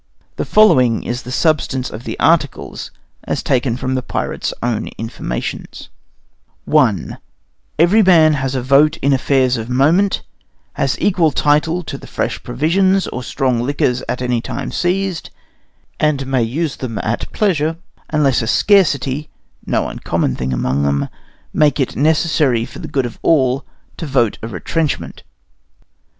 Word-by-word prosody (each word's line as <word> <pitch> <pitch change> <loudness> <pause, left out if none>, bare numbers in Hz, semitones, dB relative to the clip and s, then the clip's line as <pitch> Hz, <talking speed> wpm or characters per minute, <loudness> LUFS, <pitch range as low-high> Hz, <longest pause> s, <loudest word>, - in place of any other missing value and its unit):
The - - -2
following 130 - +4
is 120 +1 -3
the 125 - -8
substance 135 -3 0
of 115 +4 -7
articles 160 -4 0 0.4
as - - -2
taken 125 -2 0
from 130 0 -2
the 130 - 0
pirates' - - -3
own 115 -2 -1
informations: 85 - -5 0.8
I - - +2 0.6
Every 175 +8 +5
man 165 -5 +5
has 135 -2 -2
a 130 - -2
vote 145 +5 +4
in 140 0 +3
affairs 130 -1 +2
of 115 +1 -5
moment, 160 +10 +2 0.5
has - - -1
equal 180 -5 +3
title 150 +5 +1
to - - -6
the - - -12
fresh - - -3
provisions 185 +10 +1
or 125 - -5
strong 125 -1 -1
liquors 125 -1 0
at 125 0 -2
any 120 -2 0
time 130 +2 -5
seized, 185 -1 -1 0.7
and 150 -3 +1
may 130 -1 0
use 140 +7 -2
them 120 -4 -5
at 115 +2 -3
pleasure, 165 -6 +1 0.3
unless 145 -5 +2
a 115 - -3
scarcity 150 - +2 0.4
(no - - 0
uncommon - - -2
thing 65 +1 -3
among 65 +2 0
them) 70 0 0 0.4
make 150 -2 +3
it 135 - -1
necessary 150 -5 +2
for 130 - -11
the 160 - -6
good 140 -3 -1
of 120 - -7
all 135 -4 +2 0.3
to 165 - -5
vote 120 -6 +1
a 115 - -5
retrenchment. 145 - -3
135 Hz, 145 wpm, -17 LUFS, 125-160 Hz, 0.8 s, Every